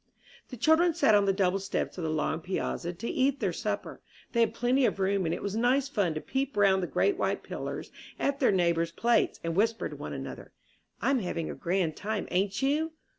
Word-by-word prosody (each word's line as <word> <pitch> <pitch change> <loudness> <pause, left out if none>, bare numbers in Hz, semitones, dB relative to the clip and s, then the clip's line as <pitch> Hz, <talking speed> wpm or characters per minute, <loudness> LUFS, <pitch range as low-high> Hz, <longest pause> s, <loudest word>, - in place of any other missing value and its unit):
The 250 - -8
children 320 +7 +4
sat 285 -10 +4
on 205 -1 +5
the 195 - +3
double 190 0 +1
steps 195 0 -3
of 180 - -5
the 160 - -1
long 155 +1 -1
piazza 175 0 -3
to 185 +7 -6
eat 275 +3 +1
their - - 0
supper. - - -4 0.3
They 235 - 0
had 230 -1 +2
plenty 250 +3 +2
of - - -3
room, 190 -2 +1
and 165 - 0
it - - -7
was 200 0 -2
nice 255 +4 +2
fun 195 - 0
to 155 - -3
peep 270 -3 -2
round 195 -2 +4
the 175 - -2
great 400 - +1
white - - 0
pillars - - -6 0.3
at 280 0 0
their 260 - +4
neighbors' 170 -3 +1
plates, 235 +7 +1
and 165 0 -2
whisper 225 +3 +1
to - - -8
one - - -6
another, - - -7 0.5
"I'm 270 -1 +3
having 170 -5 -3
a - - -5
grand 170 -3 -1
time, 210 0 -3
ain't 200 +6 0
you?" 310 +4 +1
205 Hz, 220 wpm, -29 LUFS, 180-260 Hz, 0.5 s, on